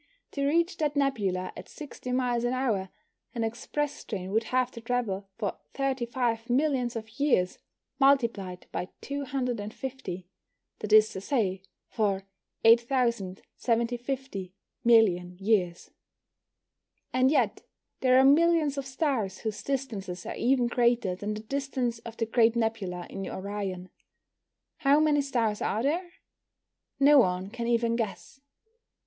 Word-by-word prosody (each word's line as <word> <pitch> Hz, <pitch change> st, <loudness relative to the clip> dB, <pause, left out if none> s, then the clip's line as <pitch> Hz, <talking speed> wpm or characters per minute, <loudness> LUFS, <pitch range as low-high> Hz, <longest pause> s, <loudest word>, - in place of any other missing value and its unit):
To 280 Hz, -1 st, -1 dB
reach 335 Hz, +4 st, +2 dB
that 300 Hz, -2 st, 0 dB
nebula 205 Hz, -10 st, 0 dB
at -, -, -10 dB
60 285 Hz, -4 st, -8 dB
miles 250 Hz, -2 st, +1 dB
an 240 Hz, +1 st, +1 dB
hour, 225 Hz, -8 st, 0 dB, 0.5 s
an 230 Hz, -, -1 dB
express 290 Hz, +6 st, -3 dB
train 190 Hz, -3 st, -5 dB
would 220 Hz, +2 st, +1 dB
have 255 Hz, +1 st, +1 dB
to 230 Hz, -, -9 dB
travel 225 Hz, -5 st, -2 dB
for 210 Hz, -4 st, -3 dB, 0.2 s
35 245 Hz, -3 st, -1 dB
millions 255 Hz, -2 st, +1 dB
of 225 Hz, +3 st, -7 dB
years 245 Hz, -11 st, +2 dB, 0.4 s
multiplied 230 Hz, -10 st, +2 dB
by 180 Hz, -, -3 dB
250 250 Hz, -7 st, -4 dB, 0.5 s
that 210 Hz, -, -5 dB
is 215 Hz, 0 st, +7 dB
to 190 Hz, -, -6 dB
say, 195 Hz, -5 st, 0 dB, 0.3 s
for 200 Hz, -3 st, -1 dB, 0.4 s
8,750 235 Hz, -1 st, +1 dB, 0.3 s
million 180 Hz, -7 st, +4 dB
years. 190 Hz, -4 st, 0 dB, 1.2 s
And 255 Hz, +1 st, +4 dB
yet 300 Hz, -, +1 dB, 0.4 s
there 255 Hz, -1 st, +4 dB
are 265 Hz, -, +6 dB
millions 305 Hz, 0 st, +4 dB
of 270 Hz, -, -5 dB
stars 260 Hz, -, -1 dB
whose 220 Hz, -2 st, -3 dB
distances 210 Hz, -10 st, -4 dB
are -, -, -4 dB
even 250 Hz, 0 st, +2 dB
greater 235 Hz, -5 st, +2 dB
than 205 Hz, +3 st, -4 dB
the 215 Hz, -, -6 dB
distance 255 Hz, -1 st, -2 dB
of 230 Hz, 0 st, -10 dB
the 225 Hz, -, 0 dB
Great 225 Hz, 0 st, +3 dB
Nebula 215 Hz, -6 st, -2 dB
in 195 Hz, 0 st, -6 dB
Orion. 190 Hz, -2 st, -4 dB, 0.9 s
How 285 Hz, -1 st, +4 dB
many 300 Hz, -2 st, +3 dB
stars 230 Hz, -6 st, 0 dB
are 220 Hz, -, 0 dB
there? 345 Hz, +5 st, -1 dB, 0.9 s
No 285 Hz, +1 st, +7 dB
one 185 Hz, -3 st, +1 dB
can 235 Hz, 0 st, -4 dB
even 235 Hz, -1 st, +2 dB
guess. 235 Hz, +4 st, -4 dB
235 Hz, 130 wpm, -28 LUFS, 205-270 Hz, 1.2 s, is